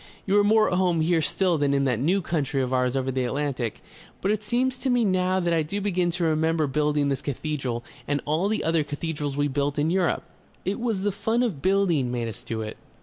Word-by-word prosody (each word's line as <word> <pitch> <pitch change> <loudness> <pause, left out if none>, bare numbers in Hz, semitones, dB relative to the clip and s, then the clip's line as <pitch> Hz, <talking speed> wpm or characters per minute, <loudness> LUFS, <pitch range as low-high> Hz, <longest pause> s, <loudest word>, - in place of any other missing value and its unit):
"You 195 - +1
are - - +4
more 215 +1 +4
at 180 - +2
home 175 -3 +2
here 165 0 +2
still 175 +1 +1
than 140 -1 +2
in 140 - +2
that 125 -4 +1
new 180 +8 +1
country 145 -5 -1
of 130 0 -2
ours 125 0 +1
over 130 0 0
the 130 0 -1
Atlantic. 130 -2 -2 0.4
But 195 - 0
it 215 -1 0
seems 250 +3 0
to 265 - -1
me 245 -2 +3
now 185 -1 +2
that 175 -2 +1
I 165 - +3
do 160 +7 -3
begin 185 -3 0
to 175 0 -2
remember 160 0 +2
building 150 +1 +1
this 135 -1 -1
cathedral 135 -4 -3 0.2
and 145 0 +1
all 155 +6 +1
the 215 +1 -1
other 165 -1 +2
cathedrals 145 -1 -4
we 145 0 +2
built 140 +1 -1
in 150 +3 +1
Europe.... 185 -2 +1 0.4
It 195 +3 -1
was 230 -5 -1
the 205 - +1
fun 225 +5 0
of 190 - -2
building 175 -8 +2
made 120 -2 -2
us 115 +1 -5
do 115 -2 -4
it..." 110 - -7
160 Hz, 235 wpm, -25 LUFS, 140-190 Hz, 0.4 s, are